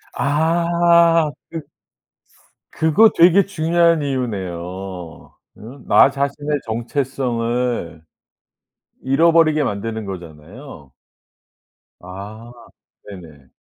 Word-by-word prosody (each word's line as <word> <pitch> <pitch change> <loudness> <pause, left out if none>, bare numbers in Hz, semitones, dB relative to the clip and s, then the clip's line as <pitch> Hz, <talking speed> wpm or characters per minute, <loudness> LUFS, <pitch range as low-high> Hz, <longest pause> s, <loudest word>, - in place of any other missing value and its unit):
아 170 +1 +2 0.2
그 165 -2 -6 1.1
그거 160 +8 +4
되게 180 +3 +5
중요한 170 -2 +1
이유네요. 115 -11 -3
어 90 -1 -9 0.5
나 - - +6
자신의 140 +1 -3
정체성을 120 - -3 1.0
잃어버리게 155 +2 +3
만드는 110 -2 -4
거잖아요. 85 - -11 1.1
아 105 +6 -10 0.6
네네. 80 -8 -13
130 Hz, 165 characters per minute, -19 LUFS, 95-160 Hz, 1.1 s, 나